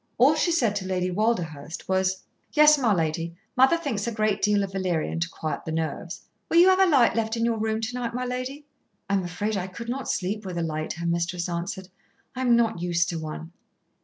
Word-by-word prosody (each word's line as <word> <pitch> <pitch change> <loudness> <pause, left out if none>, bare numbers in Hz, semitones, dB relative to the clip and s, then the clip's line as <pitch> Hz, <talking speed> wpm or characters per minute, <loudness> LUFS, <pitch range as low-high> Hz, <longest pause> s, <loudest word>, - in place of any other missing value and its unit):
All 265 +6 +6
she 315 +3 +1
said 235 -11 +2
to 190 -2 -4
Lady 185 -1 -1
Walderhurst 175 -7 -2
was: 190 0 0 0.3
"Yes, 300 0 +7
my 240 -5 +2
lady, 165 -1 -1 0.2
mother 265 +6 +5
thinks 250 -11 -3
a - - 0
great 215 -2 0
deal 205 0 +3
of 195 - -4
valerian 180 -4 -1
to 170 0 -1
quiet 155 -2 -4
the 160 - -5
nerves. 160 0 -4 0.3
Will 335 - +2
you 355 +2 +8
have 375 0 +4
a 385 - +6
light 275 -8 +4
left 225 0 -1
in 230 - +1
your 230 -1 0
room 220 0 -1
to 225 +2 -3
night, 240 -1 -3
my 250 0 -2
lady?" 255 +4 -4 0.4
"I 200 - -1
am 195 -1 +2
afraid 190 +5 -2
I 185 -1 -2
could 230 +5 -8
not 260 +1 -3
sleep 205 +3 -2
with 185 -3 -5
a 170 - 0
light," 155 -1 -3
her 170 +1 -6
mistress 170 +1 -1
answered. 180 +2 -4 0.5
"I 255 - -4
am 245 -2 +4
not 225 -7 +1
used 175 0 +1
to 170 -3 -3
one." 160 +1 -7
200 Hz, 225 wpm, -25 LUFS, 175-235 Hz, 0.5 s, you